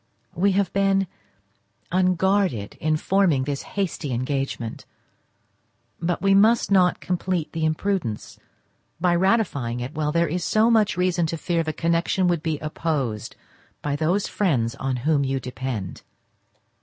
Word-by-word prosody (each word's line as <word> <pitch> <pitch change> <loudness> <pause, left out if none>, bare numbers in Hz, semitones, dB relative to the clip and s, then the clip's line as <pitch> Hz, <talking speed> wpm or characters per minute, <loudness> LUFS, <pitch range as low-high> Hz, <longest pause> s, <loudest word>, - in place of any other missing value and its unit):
We 195 +3 +2
have 200 0 0
been 195 0 +2 0.9
unguarded 185 - +1
in 155 0 +2
forming 175 -6 +2
this 140 0 -3 0.2
hasty 175 -7 -2
engagement, 130 -2 -3 1.1
but 175 +2 -1
we 195 0 +4
must 215 +2 +4
not 180 -2 +4
complete 180 -2 -2
the 160 -1 -1
imprudence 155 - -2 0.6
by 175 0 +2
ratifying 170 - +1
it 125 +4 -5
while 150 -2 -1
there 170 +2 +2
is 175 +3 -2
so 220 +4 +3
much 215 -5 +3
reason 180 -2 +1
to 165 - -3
fear 170 +1 0
the 160 -1 -2
connection 170 +3 +1
would 170 -3 0
be 160 -2 -1
opposed 150 -8 -2 0.5
by 145 -1 -1
those 170 +7 +1
friends 125 - 0
on 135 -1 -2
whom 150 -3 +3
you 135 0 -1
depend. 125 -7 -5
165 Hz, 140 wpm, -24 LUFS, 140-190 Hz, 1.1 s, we